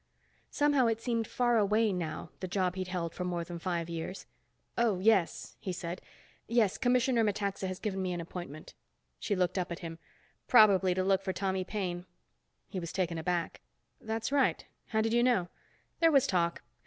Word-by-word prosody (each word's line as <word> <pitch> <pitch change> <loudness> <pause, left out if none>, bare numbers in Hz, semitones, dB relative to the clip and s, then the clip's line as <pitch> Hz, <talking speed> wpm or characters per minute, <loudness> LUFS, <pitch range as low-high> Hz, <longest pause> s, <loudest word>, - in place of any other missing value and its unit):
Somehow 290 -4 +3
it 225 -1 0
seemed 230 -2 -1
far 240 -2 +2
away 210 +1 +3
now, 170 -2 -4
the 185 - -4
job 185 -1 0
he'd 185 -1 -4
held 175 -3 -3
for 180 - -4
more 175 -1 -2
than 170 0 -7
five 170 -2 -2
years. 170 +3 -5 0.5
"Oh, 230 -5 +2
yes," 195 -2 +2
he 190 - -4
said. 175 0 -5 0.5
"Yes, 225 -4 +2
Commissioner 245 -1 +3
Metaxa 200 -2 -1
has 185 0 -4
given 195 -2 -3
me 185 -1 -1
an 175 - -3
appointment." 170 -3 -8 0.5
She 205 - -1
looked 185 0 +1
up 180 -1 -3
at 170 - -3
him. 165 0 -7 0.5
"Probably 195 -6 +6
to 185 - +1
look 195 0 +3
for 190 -1 -2
Tommy 190 -1 -1
Paine." 180 -3 -4 0.6
He 190 - -4
was 170 -2 -5
taken 175 -3 -1
aback. 170 +1 -2 0.4
"That's 225 +3 -3
right. 280 -2 +2 0.2
How 220 -1 +1
did 225 +1 0
you 240 - +4
know?" 240 -8 +2 0.5
"There 330 -1 +5
was 275 -3 +5
talk. 170 -6 0
190 Hz, 180 wpm, -31 LUFS, 175-225 Hz, 0.6 s, Probably